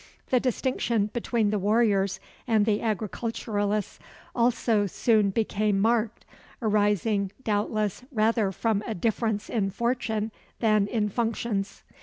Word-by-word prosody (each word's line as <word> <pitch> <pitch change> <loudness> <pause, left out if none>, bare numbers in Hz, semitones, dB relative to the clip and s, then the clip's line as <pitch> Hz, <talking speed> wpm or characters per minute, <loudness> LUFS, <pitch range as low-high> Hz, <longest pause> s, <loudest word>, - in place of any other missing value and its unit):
The 255 - +5
distinction 235 -4 0
between 230 -3 0
the 210 - 0
warriors 200 -2 +2 0.3
and 220 -3 +3
the 210 -1 +1
agriculturists 215 -1 -2 0.3
also 235 -3 +2
soon 215 +1 +2
became 210 0 0
marked, 225 +1 +1 0.3
arising 205 -2 +1
doubtless 210 0 -1
rather 220 -3 +2
from 215 +1 0
a 225 - -2
difference 220 +2 -1
in 205 -4 0
fortune 225 0 -1 0.3
than 215 -3 +3
in 215 -1 0
functions. 225 -2 -2
215 Hz, 115 wpm, -27 LUFS, 205-230 Hz, 0.3 s, The